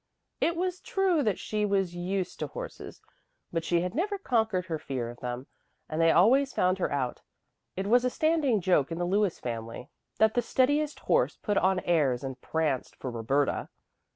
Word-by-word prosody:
It 340 - +1
was 365 +1 -2
true 380 -5 +1
that 210 -8 +1
she 210 -1 -2
was 195 -4 0
used 180 +1 -3
to - - -2
horses, - - -8 0.5
but 165 -1 -1
she 170 0 +1
had 180 +1 -3
never 400 +6 -1
conquered 220 - 0
her 165 -3 -3
fear 125 -5 -4
of 120 - -14
them, 125 +1 -5 0.4
and 155 +1 -2
they 165 - +5
always 255 +12 +4
found 185 +1 +2
her - - 0
out. 130 -3 -2 0.6
It 190 - -2
was 240 +4 +4
a 250 - +2
standing 295 -7 +2
joke 170 -5 +2
in 165 - -3
the 175 - -1
Lewis 195 0 +1
family 115 0 -6 0.3
that 220 0 +4
the 245 - +2
steadiest 290 +5 +1
horse - - +2
put 205 - -2
on 190 0 +2
airs 140 -8 +1
and 130 -1 -6
pranced 155 -5 -1
for 130 - -5
Roberta. 125 +5 0
185 Hz, 185 wpm, -28 LUFS, -, 0.6 s, they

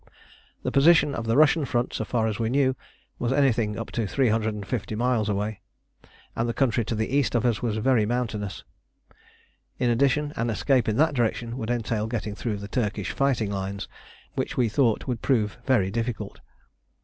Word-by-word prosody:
The - - -1
position 150 0 +5
of 115 -3 -4
the 115 +3 +2
Russian 155 +1 +5
front, 120 -2 -1
so - - -2
far 115 -3 0
as 110 -1 -2
we 115 -1 0
knew, 130 0 +2 0.4
was 120 - 0
anything 120 -6 +2
up 115 - -5
to 115 -3 -1
350 110 -3 -1
miles 115 -2 +1
away, 105 +1 -2 0.7
and 115 +1 0
the 115 - -2
country 120 -4 +2
to 115 - -2
the 110 +5 -1
east 130 -5 +1
of 120 - +2
us 115 -5 +1
was 110 -3 -1
very 110 -2 +2
mountainous. 110 -4 -3 1.1
In 125 -1 +1
addition, 140 +4 +1
an 115 0 -1
escape 120 +2 +2
in 110 - 0
that 160 +1 +3
direction 120 -1 -1
would 115 -3 -4
entail 115 -2 -1
getting 110 -3 -3
through 105 0 -3
the 100 0 -7
Turkish 105 -3 -2
fighting 125 -7 0
lines, 100 0 -4 0.5
which - - -3
we 120 -3 +2
thought 115 -1 +1
would 125 -4 -3
prove 115 -3 0
very 105 -8 +3
difficult. 115 -2 -3
115 Hz, 180 wpm, -25 LUFS, 105-130 Hz, 1.1 s, position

